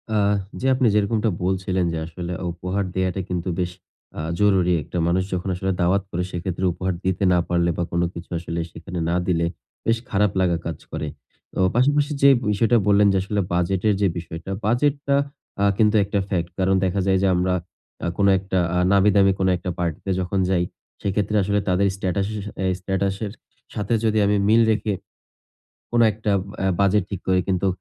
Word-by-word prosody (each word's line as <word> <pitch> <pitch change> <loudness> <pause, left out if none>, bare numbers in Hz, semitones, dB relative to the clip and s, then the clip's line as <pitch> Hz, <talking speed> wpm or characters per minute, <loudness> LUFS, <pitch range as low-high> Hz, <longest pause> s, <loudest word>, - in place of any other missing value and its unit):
আহ! 105 -1 +3 0.2
জি, - - -4
আপনি 130 -1 +2
যেরকমটা 105 +2 +2
বলছিলেন 95 0 0
যে, - - -2
আসলে, 85 +1 -6 0.2
উপহার 90 +4 -2
দেয়াটা 95 0 0
কিন্তু 90 0 -2
বেশ 90 -1 -1 0.4
অ্যা - - -5 0.2
জরুরী 95 -4 +3
একটা 90 - -6
মানুষ 90 +2 +2
যখন 90 +1 -2
আসলে 95 +1 -1
দাওয়াত 90 +3 +2
করে 90 +1 -1
সেক্ষেত্রে 90 +1 -3
উপহার 95 +2 -2
দিতে 95 +1 0
না 90 - +4
পারলে 85 0 +2
বা, 85 - 0
কোন 85 - +1
কিছু 85 - -9
আসলে 85 0 -4
সেখানে 90 +2 -7
না 85 - +1
দিলে, 85 -2 +2 0.4
বেশ 115 0 +2
খারাপ 105 -2 +2
লাগা 90 -2 +2
কাজ 85 -2 -3
করে। 75 - -3 0.5
তো - - -4 0.2
পাশাপাশি 145 +4 +3
যেই 140 -1 +7 0.2
বিষয়টা 115 +3 +3
বললেন 100 0 +5
যে, - - +2
আসলে 100 +2 -2
বাজেটের 95 +4 +1
যে 100 - +4
বিষয়টা 85 +2 -6
বাজেটটা 140 +5 +1 0.4
অ্যা 100 - +2
কিন্তু 110 0 +3
একটা 100 +1 -1
ফেক্ট। 85 -3 -1
কারণ, 95 +1 +3
দেখা 95 +2 0
যায় 95 0 +4
যে - - +4
আমরা 90 +1 +1 0.5
অ্যা - - -2
কোন 100 - +3
একটা 95 0 -3 0.2
আ - - +2
নামিদামি 100 0 +5
কোনো 95 -1 +2
একটা 90 +1 -5
পার্টিতে 85 +2 -2
যখন 95 +2 -1
যাই, 90 -2 +2 0.4
সেক্ষেত্রে 100 +2 -1
আসলে 100 +2 +1
তাদের 95 +2 +3
স্ট্যাটাসে 95 +2 -2 0.3
এ - - 0
স্ট্যাটাসের 95 +2 -2 0.4
সাথে 105 +2 -2
যদি 110 0 +2
আমি 105 +1 +2
মিল 110 +2 +5
রেখে 105 -1 0 1.0
কোন 120 - +2
একটা 105 0 -2 0.3
অ্যা 95 - +1
বাজেট 100 0 +3
ঠিক 95 -3 -5
করি, 95 0 +3
কিন্তু 95 0 +1
95 Hz, 180 wpm, -23 LUFS, 90-105 Hz, 1.0 s, যেই